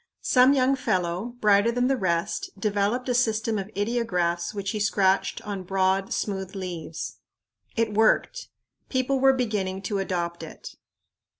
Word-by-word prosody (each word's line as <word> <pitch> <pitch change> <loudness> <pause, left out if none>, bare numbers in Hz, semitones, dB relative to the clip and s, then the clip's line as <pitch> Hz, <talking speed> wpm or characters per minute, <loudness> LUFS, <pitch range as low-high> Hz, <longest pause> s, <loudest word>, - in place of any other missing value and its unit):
Some 255 +2 +5
young 265 0 +3
fellow, 185 0 -2
brighter 205 +2 +4
than 245 +1 +1
the 270 +1 +2
rest, 170 -5 -1
developed 210 +5 0
a 250 - +1
system 225 -2 +1
of 195 +1 -5
ideographs 180 -6 0
which 200 -2 -3
he 215 - -3
scratched 200 +1 +1
on 205 -3 -4
broad, 190 +1 0
smooth 190 -2 -3
leaves. 175 -4 -6 0.6
It 225 -2 0
worked. 225 - +2 0.4
People 260 +1 0
were 270 0 +5
beginning 205 -6 -2
to 200 +1 -2
adopt 175 -3 -2
it. 160 - -10
205 Hz, 140 wpm, -25 LUFS, 190-240 Hz, 0.6 s, Some